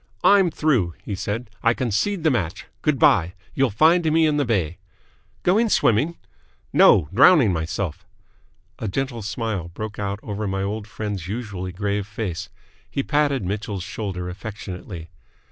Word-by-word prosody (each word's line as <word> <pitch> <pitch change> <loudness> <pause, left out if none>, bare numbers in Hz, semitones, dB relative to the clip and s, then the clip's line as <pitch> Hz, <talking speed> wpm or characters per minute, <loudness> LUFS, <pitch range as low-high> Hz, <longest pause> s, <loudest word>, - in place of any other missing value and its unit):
"I'm 195 -3 +6
through!" 125 - +1
he 105 - -4
said. 105 +4 -4
"I 115 0 +3
concede 130 - -1
the 160 - +4
match. 95 -6 -2 0.2
Good 150 -3 +1
bye. 90 -6 +4 0.2
You'll 135 -1 +2
find 160 - +4
me 160 +1 +4
in 150 -1 +2
the 145 - +1
bay!" 90 -8 -1 0.6
"Going 220 +6 +3
swimming?" 145 - +2 0.6
"No. 80 -7 +6
Drowning 135 - +6
myself." 80 +1 -3 0.8
A 110 - -3
gentle 120 +3 -2
smile 105 -4 -3
broke 105 +5 -7
out 100 0 -2
over 105 0 -3
my 95 0 -1
old 105 +1 -3
friend's 105 -5 -5
usually 100 -4 -4
grave 100 +1 -2
face. 100 -4 -4 0.4
He 140 - -2
patted 145 -7 +1
Mitchell's 100 -1 -3
shoulder 90 -1 -4
affectionately. 90 -3 -7
105 Hz, 145 wpm, -23 LUFS, 95-135 Hz, 0.8 s, I'm